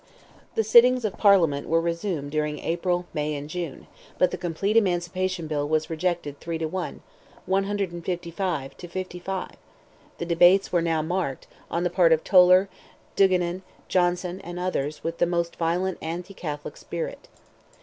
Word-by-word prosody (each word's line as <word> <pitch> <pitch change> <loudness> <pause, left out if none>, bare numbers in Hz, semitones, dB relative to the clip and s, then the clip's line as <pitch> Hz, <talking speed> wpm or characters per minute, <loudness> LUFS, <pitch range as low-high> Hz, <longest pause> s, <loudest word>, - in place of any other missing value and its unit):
The 225 - +2
sittings 240 +2 +6
of 205 - -2
Parliament 170 -9 +4
were 165 - +4
resumed 170 -3 -2
during 150 0 -1
April, 175 +2 -1
May, 150 -1 -1
and 145 0 -6
June, 165 -3 -5 0.3
but 180 - +3
the - - -2
complete 180 +4 -1
emancipation 185 -3 +1
bill 145 -2 -2
was 155 +1 0
rejected 160 -3 -2
three 165 -1 -4
to 160 - -2
one—155 180 -3 -3
to 175 - -9
55; 185 +1 -5 0.7
the 170 - -4
debates 175 +3 +5
were 175 - +2
now 165 -2 0
marked, 165 -5 -2 0.2
on 170 +1 -1
the 175 - 0
part 175 -2 +4
of 160 -1 +3
Toler, 185 0 +6 0.5
Duigenan, 185 -2 +2 0.3
Johnson, 180 +1 0
and 175 0 -7
others, 155 -5 -2
with 165 +1 -4
the 175 - +3
most 170 -1 -1
violent 175 +3 0
anti 170 +4 -5
Catholic 150 -5 -6
spirit. 170 -1 -6
175 Hz, 150 wpm, -25 LUFS, 160-185 Hz, 0.7 s, sittings